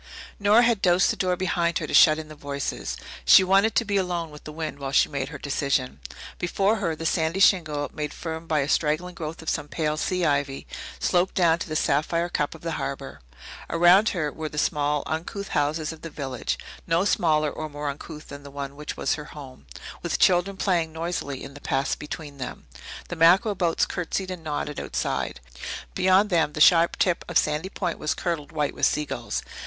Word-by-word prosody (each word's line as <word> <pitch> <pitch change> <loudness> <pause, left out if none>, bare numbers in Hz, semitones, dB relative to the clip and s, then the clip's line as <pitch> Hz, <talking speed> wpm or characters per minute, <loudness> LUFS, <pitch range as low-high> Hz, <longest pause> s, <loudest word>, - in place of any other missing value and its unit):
Nora 210 +4 +5
had 230 -4 +2
dosed 180 +1 +4
the - - -3
door 180 -1 0
behind 170 -2 0
her - - -3
to - - -6
shut 155 -1 +7
in 160 -1 -6
the 155 - -10
voices. 140 -2 -4 0.3
She 60 - +8
wanted 195 +4 +3
to 235 - +2
be 200 -1 0
alone 175 -4 -1
with 150 - -13
the 155 - -7
wind 155 -2 -5
while 135 -1 -4
she - - +4
made 140 -2 -3
her 150 - -7
decision. 135 - -1 0.4
Before 195 +5 +1
her 170 -6 -1
the 165 - -7
sandy 160 +2 +1
shingle, 155 -7 +3
made 150 -1 -3
firm 160 0 -6
by 155 -2 +2
a 140 - -1
straggling 155 +4 0
growth 160 -1 -6
of - - -15
some 145 - -2
pale 155 -1 -1
sea 180 +3 0
ivy, 140 -2 0 0.3
sloped 180 +1 +1
down 170 -2 +3
to - - -5
the 155 - -3
sapphire 165 +4 +1
cup 150 -2 -1
of 160 - -13
the 165 - -3
harbour. 135 - -5 0.5
Around 175 +6 +5
her 155 -5 -2
were 155 +1 -5
the 150 - -9
small, 150 -1 +1
uncouth 175 +5 -4
houses 155 +2 0
of 160 - -14
the 165 - -6
village 135 -5 -3 0.3
no 170 +3 +2
smaller 155 -6 +2
or 155 0 -5
more 145 0 -5
uncouth 150 +2 -7
than 140 0 -8
the 140 - -11
one 140 0 -6
which 150 +1 -6
was - - +1
her 150 - -5
home 130 - -12 0.3
with - - -1
children 185 +2 +3
playing 175 -5 +1
noisily 160 -5 -4
on 140 - -10
the 145 - -12
paths 135 +1 0
between 150 -1 -8
them. 125 -9 -6 0.4
The - - -4
mackerel 180 +7 +5
boats 175 -4 +1
curtsied 185 +2 -3
and 180 -3 -7
nodded 150 -1 -3
outside; - - -3 0.5
beyond 190 +3 +3
them 160 -3 +2
the - - -5
sharp 170 +2 +6
tip 180 -2 +1
of 175 - +2
Sandy 155 +5 0
Point 180 -4 -3
was 155 - -1
curdled 165 -4 -3
white 150 -3 -1
with - - +3
seagulls. 150 -1 -2
160 Hz, 205 wpm, -25 LUFS, 145-175 Hz, 0.5 s, She